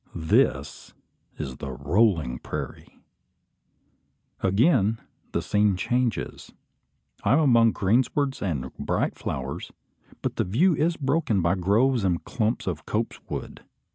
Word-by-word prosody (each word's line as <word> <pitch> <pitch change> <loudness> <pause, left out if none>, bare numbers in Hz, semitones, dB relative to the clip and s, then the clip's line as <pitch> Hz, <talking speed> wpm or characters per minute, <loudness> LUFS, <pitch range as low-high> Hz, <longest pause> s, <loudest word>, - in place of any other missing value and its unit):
This 80 - 0 0.4
is 65 -1 -5
the 70 - -6
"rolling 75 - +1
prairie." - - -7 1.4
Again 110 - +3 0.3
the - - -1
scene 105 -1 +2
changes. 120 +4 -2 0.7
I 105 - +3
am 145 - +5
among 115 -7 +5
greenswards 130 +7 +1
and 70 -9 -3
bright - - 0
flowers; - - -5 0.5
but - - -2
the - - +2
view 155 - +3
is 165 +3 +1
broken 135 - +1
by 85 +2 +3
groves 105 +6 +2
and 90 -3 0
clumps 110 0 -1
of 80 -5 -4
copse 115 +2 -2
wood. - - -6
105 Hz, 120 wpm, -25 LUFS, 90-125 Hz, 1.4 s, am